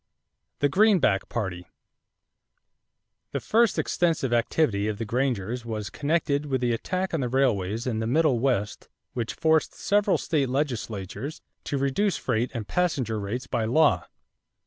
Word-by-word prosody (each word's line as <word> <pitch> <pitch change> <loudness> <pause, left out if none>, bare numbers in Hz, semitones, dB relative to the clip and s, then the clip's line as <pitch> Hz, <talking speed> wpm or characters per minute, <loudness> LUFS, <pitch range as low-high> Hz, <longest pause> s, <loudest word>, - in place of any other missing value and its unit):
=The 145 - +5
Greenback 195 - +4
Party.= 90 -6 -4 1.7
The - - 0
first 230 -1 +2
extensive 160 -8 +1
activity 115 -3 +1
of 105 -1 -2
the 115 - -3
Grangers 120 -1 -1
was 110 -3 -4
connected 150 -1 0
with 135 -2 0
the 120 -1 +1
attack 185 +11 -2
on 165 - +1
the 125 - -1
railways 115 -5 +1
in 115 -4 -1
the 110 - -1
Middle 140 -1 +3
West 115 -5 -1 0.2
which 115 -2 -3
forced 160 -1 +2
several 205 0 +2
state 145 -6 0
legislatures 120 - -3 0.2
to 140 - -1
reduce 140 +9 +1
freight 120 0 -1
and 110 -3 -4
passenger 135 -11 0
rates 110 +6 -4
by 115 -2 -1
law. 150 +6 +3
125 Hz, 145 wpm, -26 LUFS, 110-155 Hz, 1.7 s, =The